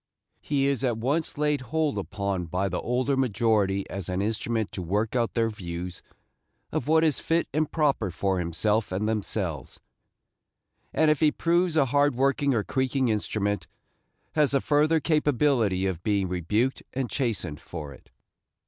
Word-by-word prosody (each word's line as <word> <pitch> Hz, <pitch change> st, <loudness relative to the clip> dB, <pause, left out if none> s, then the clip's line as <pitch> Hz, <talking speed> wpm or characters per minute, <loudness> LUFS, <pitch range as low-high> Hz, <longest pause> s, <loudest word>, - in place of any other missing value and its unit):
He 140 Hz, -2 st, 0 dB
is 140 Hz, -2 st, 0 dB
at 120 Hz, -4 st, +1 dB
once 145 Hz, +9 st, -1 dB
laid 150 Hz, -2 st, +1 dB
hold 150 Hz, +3 st, -1 dB
upon 100 Hz, -3 st, -3 dB
by 95 Hz, +4 st, -1 dB
the 90 Hz, -, -2 dB
older 130 Hz, +3 st, 0 dB
majority 105 Hz, -6 st, +1 dB
as 95 Hz, -3 st, -5 dB
an 90 Hz, 0 st, -1 dB
instrument 110 Hz, +1 st, -1 dB
to 95 Hz, -, -5 dB
work 105 Hz, +7 st, -1 dB
out 120 Hz, -2 st, 0 dB
their 115 Hz, -1 st, +2 dB
views 90 Hz, -2 st, -6 dB, 0.7 s
of 125 Hz, -, -2 dB
what 160 Hz, +1 st, +4 dB
is 155 Hz, -4 st, +2 dB
fit 165 Hz, +1 st, 0 dB
and 155 Hz, 0 st, 0 dB
proper 140 Hz, -, +1 dB
for 95 Hz, +2 st, -1 dB
himself 100 Hz, +6 st, 0 dB
and 100 Hz, +4 st, -1 dB
themselves; 95 Hz, -9 st, -3 dB, 1.1 s
and 155 Hz, -1 st, +3 dB
if 150 Hz, -, +1 dB
he 155 Hz, -1 st, +4 dB
proves 170 Hz, 0 st, +1 dB
a 140 Hz, -, +5 dB
hard 145 Hz, +1 st, +2 dB
working 140 Hz, +1 st, +2 dB
or 110 Hz, -, +1 dB
creaking 130 Hz, 0 st, 0 dB
instrument, 105 Hz, -1 st, -1 dB, 0.6 s
has 150 Hz, -3 st, +3 dB
the 140 Hz, -, +4 dB
further 155 Hz, +2 st, +3 dB
capability 140 Hz, -, +2 dB
of 90 Hz, -3 st, -2 dB
being 100 Hz, -1 st, +1 dB
rebuked 105 Hz, +9 st, 0 dB
and 130 Hz, -1 st, -1 dB
chastened 110 Hz, -, -2 dB
for 75 Hz, -5 st, -7 dB
it. -, -, -18 dB
115 Hz, 160 wpm, -26 LUFS, 95-145 Hz, 1.1 s, a